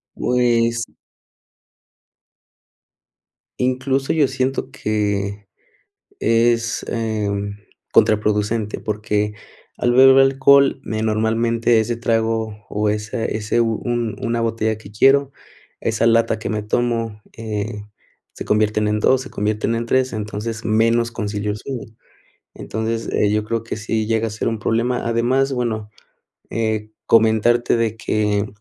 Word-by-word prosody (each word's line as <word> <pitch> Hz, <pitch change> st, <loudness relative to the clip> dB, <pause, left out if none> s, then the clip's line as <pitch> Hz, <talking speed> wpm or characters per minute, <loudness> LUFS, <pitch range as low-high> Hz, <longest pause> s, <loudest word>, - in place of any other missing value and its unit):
Pues 115 Hz, -2 st, +1 dB, 2.8 s
Incluso 130 Hz, +1 st, 0 dB
yo 150 Hz, -4 st, +3 dB
siento 130 Hz, 0 st, -2 dB
que 100 Hz, -4 st, -2 dB, 0.7 s
es, 115 Hz, +1 st, +1 dB
em, 105 Hz, -3 st, -2 dB, 0.3 s
contraproducente, 105 Hz, 0 st, +1 dB
porque, 105 Hz, 0 st, -2 dB, 0.4 s
al 120 Hz, -, +1 dB
beber 130 Hz, +1 st, +7 dB
alcohol, 135 Hz, +1 st, +4 dB
me 110 Hz, 0 st, -3 dB
normalmente 115 Hz, +1 st, +1 dB
ese 115 Hz, +2 st, 0 dB
trago, 115 Hz, -2 st, -1 dB
o 105 Hz, 0 st, 0 dB
esa 105 Hz, +2 st, -2 dB
ese, 110 Hz, +2 st, -1 dB
un 115 Hz, 0 st, -1 dB
una 115 Hz, -1 st, -1 dB
botella 110 Hz, -1 st, -1 dB
que 105 Hz, -2 st, -13 dB
quiero, 135 Hz, +5 st, +4 dB, 0.5 s
esa 115 Hz, 0 st, 0 dB
lata 115 Hz, -1 st, +3 dB
que 110 Hz, -, -5 dB
me 105 Hz, -1 st, -2 dB
tomo, 115 Hz, -1 st, -1 dB, 0.2 s
eh, 105 Hz, -1 st, -4 dB, 0.5 s
se -, -, -8 dB
convierten 105 Hz, 0 st, +1 dB
en 105 Hz, 0 st, 0 dB
2, 130 Hz, +4 st, +3 dB
se 130 Hz, -, -8 dB
convierten 105 Hz, +2 st, -1 dB
en 115 Hz, +1 st, -2 dB
3, 130 Hz, +1 st, +1 dB
entonces, 110 Hz, +1 st, -5 dB
menos 115 Hz, +2 st, +2 dB
concilio 105 Hz, -2 st, -3 dB
el 105 Hz, -, -3 dB
sueño, 120 Hz, -2 st, -7 dB, 0.6 s
entonces, 110 Hz, +1 st, -4 dB
eh, 105 Hz, -, +2 dB
yo 105 Hz, 0 st, 0 dB
creo 115 Hz, +1 st, -2 dB
que 115 Hz, -, -5 dB
sí 110 Hz, 0 st, -2 dB
llega 115 Hz, 0 st, 0 dB
a -, -, -4 dB
ser 105 Hz, -, -4 dB
un 115 Hz, -1 st, -2 dB
problema, 120 Hz, +3 st, 0 dB
además, 125 Hz, +4 st, +1 dB
bueno, 110 Hz, -4 st, -2 dB, 0.6 s
eh, 110 Hz, -1 st, -2 dB
comentarte 115 Hz, +2 st, +3 dB
de 115 Hz, -1 st, 0 dB
que 105 Hz, -2 st, 0 dB
115 Hz, 125 wpm, -20 LUFS, 105-120 Hz, 2.8 s, beber